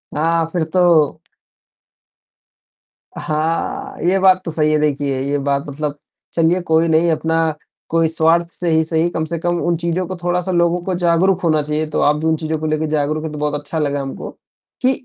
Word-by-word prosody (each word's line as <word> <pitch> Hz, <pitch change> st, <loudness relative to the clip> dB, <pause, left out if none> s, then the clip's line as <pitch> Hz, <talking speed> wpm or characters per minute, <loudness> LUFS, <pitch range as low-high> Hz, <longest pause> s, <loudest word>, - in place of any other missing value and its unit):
हाँ, 165 Hz, +2 st, +1 dB
फिर 170 Hz, -3 st, +1 dB
तो 170 Hz, -5 st, +3 dB, 2.0 s
हाँ, 155 Hz, +2 st, -2 dB
ये 190 Hz, +1 st, +3 dB
बात 185 Hz, -1 st, +5 dB
तो 165 Hz, -, -3 dB
सही 155 Hz, -1 st, +1 dB
है 155 Hz, -, +3 dB
देखिए 140 Hz, -2 st, 0 dB
ये 140 Hz, +1 st, -1 dB
बात 140 Hz, 0 st, -1 dB
मतलब 145 Hz, +1 st, -4 dB, 0.4 s
चलिए 170 Hz, +2 st, +2 dB
कोई 160 Hz, +1 st, +3 dB
नहीं 165 Hz, +1 st, +3 dB
अपना 160 Hz, 0 st, 0 dB, 0.3 s
कोई 165 Hz, 0 st, +2 dB
स्वार्थ 165 Hz, +1 st, +2 dB
से 175 Hz, -1 st, -3 dB
ही 160 Hz, 0 st, +3 dB
सही, 160 Hz, +1 st, 0 dB
कम 160 Hz, -2 st, -2 dB
से 170 Hz, +1 st, -3 dB
कम 175 Hz, +1 st, -1 dB
उन 170 Hz, 0 st, +1 dB
चीज़ों 170 Hz, +2 st, -1 dB
को 185 Hz, -, -5 dB
थोड़ा-सा 180 Hz, +1 st, 0 dB
लोगों 175 Hz, 0 st, +2 dB
को 185 Hz, -, -2 dB
जागरूक 175 Hz, +2 st, +2 dB
होना 155 Hz, -2 st, +3 dB
चाहिए, 150 Hz, +1 st, -2 dB
तो 155 Hz, -, -2 dB
आप 150 Hz, +1 st, +3 dB
भी 155 Hz, -, -4 dB
उन 160 Hz, -, +3 dB
चीज़ों 160 Hz, 0 st, -2 dB
को 155 Hz, -, -4 dB
लेके 155 Hz, 0 st, 0 dB
जागरूक 155 Hz, +1 st, -1 dB
हैं 160 Hz, -, -4 dB
तो 150 Hz, -, -6 dB
बहुत 150 Hz, 0 st, -1 dB
अच्छा 150 Hz, +2 st, -4 dB
लगा 145 Hz, -1 st, -1 dB
हमको। 135 Hz, 0 st, -6 dB, 0.5 s
कि 260 Hz, +1 st, +4 dB
160 Hz, 195 wpm, -18 LUFS, 150-170 Hz, 2.0 s, बात